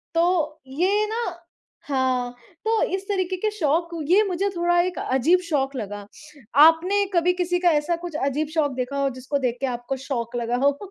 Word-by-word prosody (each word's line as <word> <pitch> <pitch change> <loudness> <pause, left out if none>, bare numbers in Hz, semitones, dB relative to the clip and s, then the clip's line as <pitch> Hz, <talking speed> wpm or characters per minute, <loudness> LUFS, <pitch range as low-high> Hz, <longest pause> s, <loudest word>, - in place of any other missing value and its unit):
तो, 335 -3 +1
ये 370 +10 +1
ना 440 - -4 0.7
हाँ, 255 -3 0 0.3
तो 445 0 +2
इस 380 - -5
तरीके 375 -2 -1
के 430 +4 0
शौक 335 -4 0 0.2
ये 395 +4 +6
मुझे 385 +2 0
थोड़ा 345 0 +2
एक 360 0 -3
अजीब 270 +8 +2
शौक 275 -3 0
लगा। 205 -4 -5 0.6
आपने 360 +6 +4
कभी 350 +1 +3
किसी 355 0 0
का 355 -1 +4
ऐसा 340 +3 -1
कुछ 340 -3 -6
अजीब 295 +3 -1
शौक 305 -3 +1
देखा 255 +2 -3
हो, 275 0 +1
जिसको 265 +3 -2
देख 250 -3 -1
के - - +1
आपको 245 +3 -4
शॉक 235 -4 -3
लगा 240 0 -1
हो? 285 0 +3
320 Hz, 180 wpm, -23 LUFS, 265-360 Hz, 0.7 s, ये